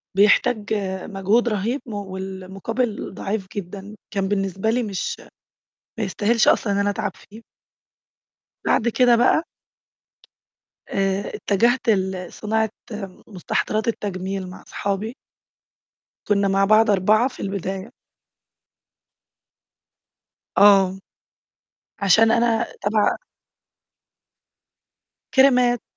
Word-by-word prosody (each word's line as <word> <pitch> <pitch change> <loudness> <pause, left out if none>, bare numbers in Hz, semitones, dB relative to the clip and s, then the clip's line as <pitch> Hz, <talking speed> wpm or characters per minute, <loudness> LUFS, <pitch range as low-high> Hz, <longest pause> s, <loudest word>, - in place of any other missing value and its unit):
بيحتاج 210 +2 +3 0.3
مجهود 205 +4 +1
رهيب 225 +6 -1
والمقابل 195 +2 -4
ضعيف 195 0 -4
جدًا، 200 +2 -7 0.2
كان 195 -2 0
بالنسبة 195 +1 -1
لي 240 +2 +1
مش 200 -4 -3 0.8
ما - - 0
يستاهلش 215 +4 +1
أصلًا 205 - +3
إن - - 0
أنا 200 0 +1
أتعب 205 +1 -2
فيه. 220 +2 -15 1.2
بعد 230 - +2
كده 245 +1 +4
بقى 250 +7 +3 1.4
آآ 195 0 0
اتجهت 235 +5 +1
لصناعة 205 +3 -1 0.6
مستحضرات 215 +2 -2
التجميل 195 -3 -3
مع 185 - -11
أصحابي. 205 +4 -4 1.1
كنّا 200 -1 +2
مع 195 0 +3
بعض 215 +2 +5
4 210 +5 +3
في 265 - -11
البداية. 195 +2 -4 2.7
آه، 195 -2 +6 1.0
عشان 220 +3 +5
أنا 230 0 +2 0.2
تبع 205 +1 +2 2.2
كْرِيمَات. 250 -3 +4
205 Hz, 90 wpm, -22 LUFS, 195-225 Hz, 2.7 s, آه